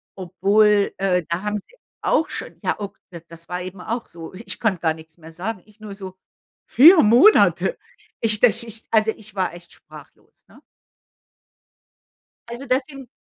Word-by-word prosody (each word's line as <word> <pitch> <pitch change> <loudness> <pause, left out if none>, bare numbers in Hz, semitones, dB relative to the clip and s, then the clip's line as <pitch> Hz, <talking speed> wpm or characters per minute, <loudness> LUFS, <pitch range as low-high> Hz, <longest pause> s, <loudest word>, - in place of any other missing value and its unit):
Obwohl, 200 +3 +2
äh, 180 -2 0
da 170 +2 -2
haben 210 0 -2
sie 445 - -22 0.3
auch 320 - +1
schon, - - -6
ja, - - 0
o 205 -1 -6 0.2
d 170 - -10
das 165 0 -14
war 180 0 -4
eben 185 +1 -8
auch 230 +5 -4
so. 165 0 -11
Ich 205 +5 -6
konnte 205 -6 0
gar 160 -1 0
nix 160 0 -16
mehr 165 -1 -14
sagen. 185 +3 -5
Ich 215 0 -24
nur 210 -2 -9
so: 190 -2 -10 0.5
„4 325 +6 +7
Monate?“ 320 - +4 0.4
Ich 215 -2 +1
das 235 0 +3
ist 225 -1 -8
also 220 0 +3
ich 215 -2 -14
war 190 -3 -1
echt 175 0 -14
sprachlos, - - -17
ne? - - -20 1.9
Also 240 +3 -7
das 255 +2 +1
sind 275 -3 -11
205 Hz, 175 wpm, -21 LUFS, 180-225 Hz, 1.9 s, 4